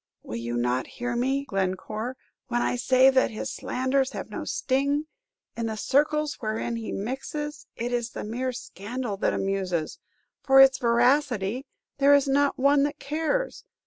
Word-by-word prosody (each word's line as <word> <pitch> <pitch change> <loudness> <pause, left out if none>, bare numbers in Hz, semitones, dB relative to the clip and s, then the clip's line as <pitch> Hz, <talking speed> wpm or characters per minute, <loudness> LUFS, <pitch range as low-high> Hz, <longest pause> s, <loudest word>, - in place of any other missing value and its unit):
"Will 110 - -5
you 120 +1 -3
not 125 +2 0
hear 245 0 -2
me, 270 +3 0
Glencore, 210 +4 -3 0.3
when 240 -1 0
I - - 0
say 255 +2 +5
that 260 -1 +3
his 215 - -5
slanders 260 +1 0
have - - -6
no - - -5
sting? 280 +3 0 0.5
In 230 -1 -2
the 220 - -3
circles 300 +5 +1
wherein 225 +1 -2
he 225 -1 -5
mixes, 290 +6 -4
it 240 +1 -3
is 240 -1 -1
the - - -6
mere 245 +4 -2
scandal 240 -2 -5
that - - +1
amuses; 185 -5 -2 0.4
for 270 -1 +5
its 270 0 +7
veracity, 245 -1 +2 0.3
there 285 +1 +7
is 280 -1 +3
not 280 +1 +2
one 280 +2 +4
that 290 +1 0
cares. 320 - -2
255 Hz, 160 wpm, -26 LUFS, 220-280 Hz, 0.5 s, its